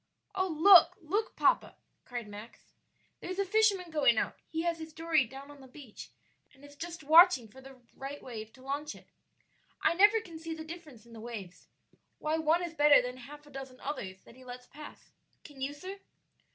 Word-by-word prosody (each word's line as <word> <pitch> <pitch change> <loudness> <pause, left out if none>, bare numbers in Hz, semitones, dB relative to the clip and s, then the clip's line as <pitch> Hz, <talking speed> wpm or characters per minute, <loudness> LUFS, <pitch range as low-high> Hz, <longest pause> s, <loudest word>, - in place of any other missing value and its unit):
"Oh, 380 -1 0
look, 355 +5 +7
look, 400 +6 -2
papa!" - - +2 0.3
cried 240 -3 -6
Max; 210 +3 -12 0.5
"there's 370 +1 -6
a 395 - 0
fisherman 395 -3 +2
going 285 -7 +3
out; - - -1
he 325 0 -3
has 340 -1 -1
his 320 -1 -9
dory 320 -3 +1
down 270 +4 -11
on 285 -1 -15
the 265 - -13
beach, 260 -4 -12 0.5
and 270 +2 -17
is 285 0 -15
just 340 +1 -7
watching 320 -4 +6
for 260 +5 -15
the 265 -1 -14 0.2
right 275 +2 -7
wave 220 -3 -8
to 260 - -17
launch 290 +3 -4
it. - - -18 0.7
I - - +2
never 415 +5 +5
can 335 -7 -11
see 325 0 -6
the 315 0 -8
difference 315 -9 -11
in 235 - -16
the 225 - -10
waves 215 -6 -9 0.5
why 310 +1 -1
one 320 +3 +2
is 340 -2 -5
better 295 -2 +6
than 250 0 -4
half 295 +4 -12
a 295 - -17
dozen 265 -2 -9
others 190 -10 -6
that - - -16
he 260 - -16
lets 250 0 -10
pass. 295 +4 -13 0.3
Can 285 -3 -14
you, 270 +2 -2
sir?" 370 +7 -9
295 Hz, 200 wpm, -31 LUFS, 255-335 Hz, 0.7 s, look